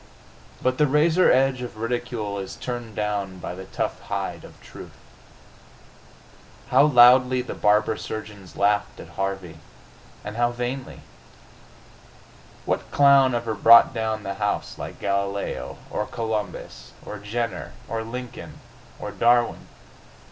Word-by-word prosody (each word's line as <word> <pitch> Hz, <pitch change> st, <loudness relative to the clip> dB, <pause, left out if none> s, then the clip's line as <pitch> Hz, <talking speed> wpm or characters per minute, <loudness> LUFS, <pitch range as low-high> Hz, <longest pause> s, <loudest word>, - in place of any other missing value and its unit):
But 130 Hz, 0 st, 0 dB
the 150 Hz, -, +4 dB
razor 155 Hz, +6 st, +4 dB
edge 130 Hz, 0 st, +2 dB
of 120 Hz, -3 st, -7 dB
ridicule 115 Hz, -3 st, -3 dB
is 95 Hz, -, -6 dB
turned 120 Hz, -3 st, -6 dB
by 100 Hz, -4 st, -3 dB
the 95 Hz, +1 st, -9 dB
tough -, -, -3 dB
hide -, -, -4 dB
of -, -, -14 dB
truth. -, -, -12 dB, 1.7 s
How 135 Hz, +3 st, +5 dB
loudly 125 Hz, -1 st, +6 dB
the -, -, -6 dB
barber 105 Hz, +1 st, +2 dB
surgeons 105 Hz, -3 st, -8 dB
laughed 105 Hz, +1 st, +1 dB
at 85 Hz, -, -10 dB
Harvey 95 Hz, -3 st, -4 dB, 0.7 s
and 105 Hz, +1 st, -6 dB
how 120 Hz, 0 st, +3 dB
vainly! 125 Hz, +2 st, -5 dB, 1.6 s
What -, -, -2 dB
clown 140 Hz, -3 st, +5 dB
ever 115 Hz, -1 st, -2 dB
brought 115 Hz, +4 st, +7 dB
down 110 Hz, -2 st, -2 dB
the 100 Hz, -, -3 dB
house 105 Hz, 0 st, -2 dB
like -, -, -7 dB
Galileo? 100 Hz, 0 st, -2 dB
Or 105 Hz, -, -2 dB
Columbus? 105 Hz, -, -5 dB
Or 105 Hz, -, -7 dB
Jenner? 105 Hz, -, -4 dB
Or 115 Hz, -1 st, -3 dB
Lincoln? 125 Hz, +2 st, -8 dB, 0.4 s
Or 105 Hz, -, -6 dB
Darwin?... 120 Hz, +4 st, +2 dB
110 Hz, 125 wpm, -24 LUFS, 100-125 Hz, 1.7 s, brought